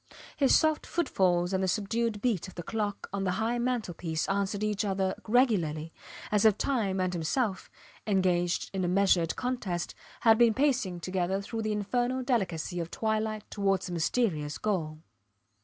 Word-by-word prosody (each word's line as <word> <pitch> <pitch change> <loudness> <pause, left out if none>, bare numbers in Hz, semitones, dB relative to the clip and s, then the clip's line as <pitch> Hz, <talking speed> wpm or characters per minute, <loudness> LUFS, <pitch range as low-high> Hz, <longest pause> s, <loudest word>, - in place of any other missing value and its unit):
His 275 -3 +4
soft 315 -1 +2
footfalls 185 - +1
and 190 - +1
the - - +1
subdued 215 +2 -1
beat 220 -8 0
of 185 - -12
the 175 - -5
clock 210 0 -3
on 200 -1 -1
the 185 -1 0
high 225 +4 0
mantel 240 -6 -1
piece 160 -2 -3
answered 200 +1 -1
each 210 0 0
other 190 -2 0
regularly 175 - +2 0.4
as 210 -1 +3
if 215 -2 +5
time 210 -8 0
and 185 0 0
himself, 190 - -1 0.4
engaged 180 -3 +1
in 190 -1 -1
a - - +1
measured 180 -3 +3
contest, 215 -9 -3 0.3
had 225 -1 +5
been 235 -2 +5
pacing 255 -11 +1
together 185 +1 -1
through 225 +3 -4
the 215 0 -1
infernal 245 +5 -1
delicacy 185 -8 -1
of 165 -1 -3
twilight 220 0 -1
towards 195 -3 0
a - - -4
mysterious 160 -4 0
goal. 165 -7 -2
200 Hz, 165 wpm, -29 LUFS, 180-225 Hz, 0.4 s, if